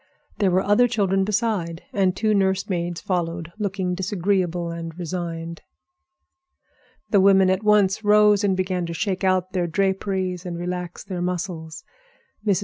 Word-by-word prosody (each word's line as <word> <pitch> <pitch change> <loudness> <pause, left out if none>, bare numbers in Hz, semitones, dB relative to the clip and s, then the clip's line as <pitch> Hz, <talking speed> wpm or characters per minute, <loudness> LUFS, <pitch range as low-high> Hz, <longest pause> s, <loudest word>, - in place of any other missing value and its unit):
There 200 -3 +3
were 185 +1 +2
other 210 +5 +4
children 195 -4 +1
beside, 205 -6 -1
and 190 -2 +2
two 215 +1 +1
nurse 190 -1 +1
maids 175 -2 -2
followed, 170 -2 -2
looking 190 -3 -1
disagreeable 180 -2 -1
and 165 0 -7
resigned. 170 -1 -5 1.5
The 200 - +5
women 190 -1 +5
at 190 +1 0
once 210 -1 +3
rose 210 0 +5
and 190 -2 +2
began 185 -2 -1
to 170 - -5
shake 195 +1 -2
out 185 -1 +1
their 180 -2 0
draperies 190 0 -1
and 175 -2 -5
relax 180 0 -5
their 180 -3 -5
muscles. 175 -2 -4 0.6
Mrs. 200 -4 +2
185 Hz, 145 wpm, -23 LUFS, 175-200 Hz, 1.5 s, The